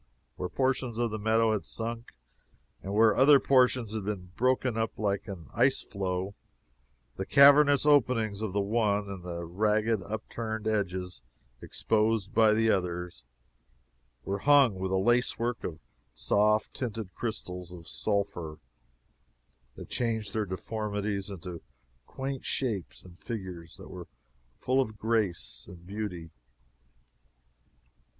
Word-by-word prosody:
Where 90 - -4
portions 130 0 -1
of 120 -1 0
the 110 - -3
meadow 110 +1 +3
had 105 - -2
sunk, 115 +1 -5 0.7
and 95 - -6
where 110 +1 +5
other 140 +2 +7
portions 125 -5 +3
had 110 -2 -3
been 95 -3 -5
broken 130 -1 +1
up 110 0 -2
like 100 -1 -1
an 90 -6 -8
ice - - +3
floe, 95 0 -3 0.8
the 95 - -3
cavernous 145 0 +7
openings 115 -8 +3
of 110 -3 -2
the 100 +2 0
one, 105 -1 +1
and 100 -2 -7
the 85 -1 -5
ragged 105 +4 +1
upturned 110 +2 -5
edges 95 -7 -2 0.4
exposed 110 -1 0
by 110 -2 +5
the 110 0 +3
other, 90 -2 -1 1.1
were 100 +1 -2
hung 140 -2 +5
with 95 0 -2
a 95 - +2
lace 120 +6 +2
work 120 0 -2
of 80 - -4 0.4
soft 105 - +2
tinted 110 -6 -5
crystals 90 -6 -5
of 85 -2 -11
sulphur 100 -7 -2 1.2
that - - -10
changed 110 -4 -1
their 110 -2 -1
deformities 105 +1 -3
into 90 -3 -7 0.5
quaint 135 0 -5
shapes 110 -9 -2
and 90 -1 -15
figures 90 -7 -7
that - - -11
were - - -8 0.5
full 130 +1 +2
of 110 -4 -4
grace 105 - -1
and 85 -1 -13
beauty. 90 -5 -5
105 Hz, 130 wpm, -29 LUFS, 95-115 Hz, 1.2 s, other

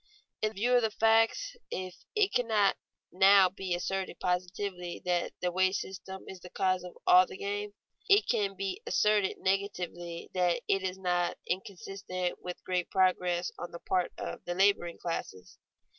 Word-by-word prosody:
In 215 0 0
view 235 +5 +1
of 245 - +6
the 220 - +1
facts, 225 - +2
if 185 -1 -5 0.2
it 415 -2 +3
cannot 220 -5 +3 0.4
now 190 0 +6
be 185 -1 -3
asserted 190 +2 -3
positively 180 0 -2
that 175 -1 0
the 180 - 0
wage 185 +1 +2
system 190 -1 -6
is 190 - -8
the 180 - -11
cause 185 -1 0
of 180 - -10
all 180 0 +7
the - - -9
gain, 205 +1 -4 0.3
it 405 +2 +6
can 205 -4 +1
be 195 - -3
asserted 210 - +2
negatively 180 -3 -3
that 180 -2 +1
it 195 - +2
is 190 0 -3
not 180 -2 0
inconsistent 185 -1 -4
with 180 0 -7
great 180 -1 -1
progress 180 -1 +1
on 175 - -5
the 170 - -9
part 180 0 0
of - - -6
the 175 - -3
laboring 190 -3 +2
classes. 95 - -6
190 Hz, 160 wpm, -30 LUFS, 180-200 Hz, 0.4 s, all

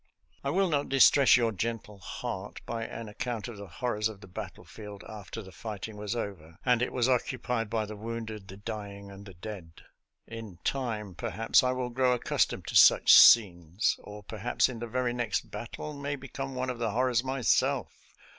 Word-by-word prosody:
I 140 - -1
will 190 +5 +2
not 145 -4 0
distress 135 -1 +6
your 115 -2 +2
gentle 105 0 -4
heart - - -6
by 115 -1 -3
an 115 0 -7
ac 105 - -12
count 120 -4 -3
of 120 -3 -8
the 100 0 -8
horrors 105 +4 -1
of 105 -3 -10
the 100 - -13
battlefield 100 +1 -9
after 105 0 -8
the 95 - -12
fighting 110 +1 -7
was 105 +2 -4
over 90 -8 -6
and 125 -2 +3
it 125 - 0
was 125 -1 +1
occupied 125 -3 0
by 110 -1 -1
the 105 +1 -8
wounded, 110 -2 -6
the 95 - -10
dying, 100 -2 -7
and 100 +1 -11
the 95 - -12
dead. 85 -3 -9 0.4
In 110 -6 -9
time, 110 -7 -2
per - - -4
haps, 110 +5 +3
I 125 0 +1
will 125 -1 -3
grow 125 +1 +2
accustomed 125 - 0
to - - -5
such - - +8
scenes, 90 -4 +6
or 105 0 -10
perhaps 110 +3 0
in 120 -3 -6
the 120 - -4
very 125 +1 -1
next 120 -3 -2
battle 135 +6 -6
may 145 0 -3
become 135 0 -6
one 130 0 -1
of 120 - -8
the 115 -2 0
horrors 125 +2 +1
myself. 130 -2 +1
115 Hz, 195 wpm, -29 LUFS, 105-125 Hz, 0.4 s, such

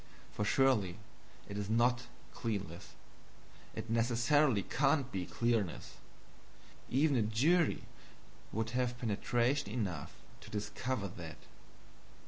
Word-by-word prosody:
For 105 - -2
surely 105 -7 +3 0.5
it 100 0 -4
is 100 0 -3
NOT 120 +2 +2 0.3
clearness 100 -7 -4 0.8
it - - -5
necessarily 120 +1 +3
can't 135 -1 +2
be 90 -2 -3
clearness. 115 -7 -1 0.9
Even 140 +2 +3
a 120 - +3
jury 140 +11 +3 0.7
would 110 +1 -2
have 125 0 0
penetration 120 +2 +1
enough 95 - -3 0.2
to - - -12
discover 105 +1 -2
that. 85 -3 -8
115 Hz, 105 wpm, -34 LUFS, 105-130 Hz, 0.9 s, surely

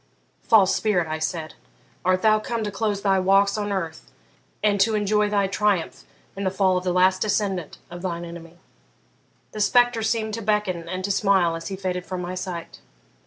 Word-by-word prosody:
"False 200 -4 +4
spirit," 185 -6 +1
I 155 0 -3
said, 160 0 -3 0.5
"art 185 0 +1
thou 215 -1 +5
come 230 +1 -3
to 205 - -3
close 205 -1 -2
thy 195 -2 +3
walks 195 +1 +3
on 205 -1 -2
earth 165 -5 -4 0.5
and 205 -2 +2
to 220 +2 +3
enjoy 210 0 +1
thy 200 -1 +2
triumph 195 -3 -1 0.3
in 200 - -4
the 190 - +1
fall 190 -1 +2
of 180 - -3
the 180 - 0
last 185 +1 +3
descendant 195 -6 -1
of 175 0 -8
thine 175 -2 -4
enemy?" 170 0 -11 0.9
The 215 - -5
spectre 245 +1 +3
seemed 220 -1 -1
to 230 - -3
beckon 200 -5 -1
and 185 +1 -4
to 200 - -1
smile 190 -4 +2
as 165 0 -6
he 195 - -4
faded 185 -1 -3
from 185 -1 -4
my 180 0 -4
sight. 180 -2 -6
195 Hz, 190 wpm, -24 LUFS, 180-210 Hz, 0.9 s, thou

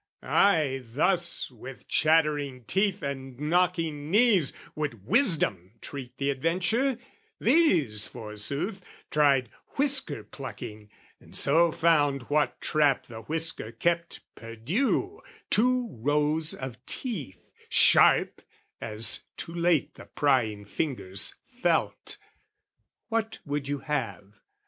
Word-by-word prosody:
Ay, 155 -9 +2
thus, 170 +8 0
with 125 +2 -12
chattering 150 -5 +1
teeth 195 - 0
and 135 -2 -6
knocking 165 -2 0
knees, 205 - +4 0.2
Would 125 -10 -5
wisdom 150 - +2
treat 130 -1 -9
the 140 +1 0
adventure: 185 - 0 0.4
these, 175 - +3
forsooth, 125 - -4 0.3
Tried 140 -5 +2 0.2
whisker 275 -1 0
plucking, 110 -6 -9 0.3
and - - -13
so 165 +4 +4
found 145 -5 +2
what 150 0 +1
trap 150 -4 +1
The 115 -2 -10
whisker 160 -2 +1
kept 170 +8 -2
perdue, 175 - -2 0.3
two 250 +2 +2
rows 150 +5 0
of 125 -1 -8
teeth 155 - -5 0.2
Sharp, - - +5 0.4
as 110 0 +1
too 165 - -6
late 170 -3 +1
the - - -13
prying 115 -8 0
fingers 100 -6 -1
felt. - - -2 0.9
What 225 0 -2
would 145 -1 -3
you 145 0 -3
have? 100 - -4
150 Hz, 105 wpm, -27 LUFS, 125-175 Hz, 0.9 s, Sharp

